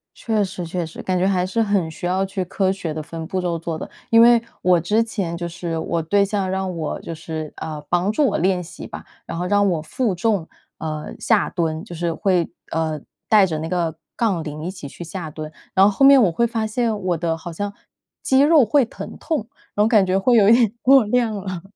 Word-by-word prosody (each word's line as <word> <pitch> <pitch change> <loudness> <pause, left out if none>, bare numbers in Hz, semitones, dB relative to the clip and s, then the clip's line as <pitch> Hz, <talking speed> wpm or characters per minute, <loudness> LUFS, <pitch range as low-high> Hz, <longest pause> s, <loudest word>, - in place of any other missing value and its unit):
确 220 -3 0
实， 180 -2 -5
确 175 +1 -3
实。 160 - -9
感 185 -1 -1
觉 185 - +2
还 185 -2 +1
是 225 +5 0
很 200 -6 +1
需 160 - -7
要 185 +2 +1
去 190 -1 -3
科 190 +1 0
学 175 -5 -4
地 155 - -4
分 165 +1 -7
步 185 +2 -2
骤 175 -2 -1
做 165 0 -4
的。 - - -7 0.2
因 230 0 +6
为 235 0 +7 0.2
我 180 -1 +4
之 210 +7 +2
前 195 -7 -3
就 175 - -4
是， 170 -1 -4
我 165 +1 -1
对 200 +5 +2
象 200 -2 -1
让 190 -1 -2
我 160 -2 -3
就 165 - -6
是 160 -1 -6
呃， 155 -2 -5
帮 175 +3 +2
助 285 +7 +2
我 210 - 0
练 180 0 +1
习 170 - -10
吧， - - -9 0.2
然 165 - -6
后 175 - -2
让 205 +1 +3
我 165 -4 -1
负 195 +5 -1
重， 200 -3 0 0.3
呃， 155 -1 -5
下 220 -3 +2
蹲， 160 -2 -2
就 185 -5 -9
是 170 0 -1
会， 180 -2 +1 0.2
呃， 160 -1 -1 0.3
带 210 -3 +6
着 160 -4 -3
那 160 - -4
个 170 -3 -1 0.2
杠 195 -9 0
铃 150 0 -6
一 180 - -3
起 180 -7 -9
去 175 - -9
下 170 -1 -6
蹲。 155 0 -7 0.2
然 190 0 +6
后 205 - +4
后 275 - +4
面 275 -1 +8
我 185 -6 +4
会 235 +8 +1
发 225 -1 -2
现， 220 -1 -1
我 180 -2 0
的 165 0 -1
好 170 +1 -8
像 205 +4 -4 0.5
肌 265 - +3
肉 295 -3 +6
会 275 +6 +4
疼 - - -9
痛， 300 -10 -2 0.3
然 210 - +3
后 215 - +3
感 215 -4 +4
觉 185 +1 +1
会 240 +6 +3
有 205 -3 +6
一 - - +8
点 235 -2 +3
过 265 -2 +6
量 230 0 +1
了。 185 -3 -5
185 Hz, 255 characters per minute, -21 LUFS, 165-215 Hz, 0.5 s, 面